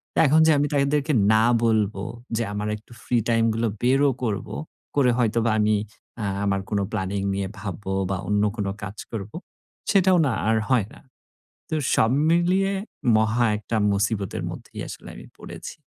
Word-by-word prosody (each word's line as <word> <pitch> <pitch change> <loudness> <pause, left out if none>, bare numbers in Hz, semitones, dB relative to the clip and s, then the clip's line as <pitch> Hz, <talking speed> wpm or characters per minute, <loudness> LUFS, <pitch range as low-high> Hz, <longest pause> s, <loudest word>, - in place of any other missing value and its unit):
তা, - - +2
এখন 155 +3 +5
যে - - +6
আমি 145 +1 +2
তাদেরকে 145 +2 +1 0.2
না 110 0 +4 0.2
বলবো 105 -3 +1 0.3
যে 115 - 0
আমার 105 +1 -3
একটু 105 +3 -22
ফ্রি 125 - +1
টাইম 115 -1 +3
গুলো 115 +1 0 0.2
বেরও 135 +3 +4
করবো। 105 -5 -3 0.4
করে 135 -4 +4
হয়তোবা 115 -1 +1
আমি 105 0 +3 0.5
আ - - -1 0.2
আমার 100 -1 +1
কোন 105 - 0
প্ল্যানিং 100 -1 -2
নিয়ে 100 0 -2
ভাববো 95 -1 -5 0.2
বা 95 - -1
অন্য 105 0 +2
কোন 100 -3 -1 0.2
কাজ 100 +2 -6
করবো। 105 +1 -6 0.6
সেটাও 190 -2 +4
না 130 - 0 0.2
আর 110 - +3
হয় 120 -6 +2
না। - - -14 0.7
তো - - -1 0.2
সব 110 +1 +3 0.2
মিলিয়ে 180 +3 +2 0.5
মহা 110 +2 +2
একটা 110 +2 -4 0.2
মুসিবতের 100 -1 -1
মধ্যেই - - -9
আসলে - - -9
আমি - - -11
পড়েছি। - - -9
110 Hz, 165 wpm, -24 LUFS, 105-135 Hz, 0.7 s, যে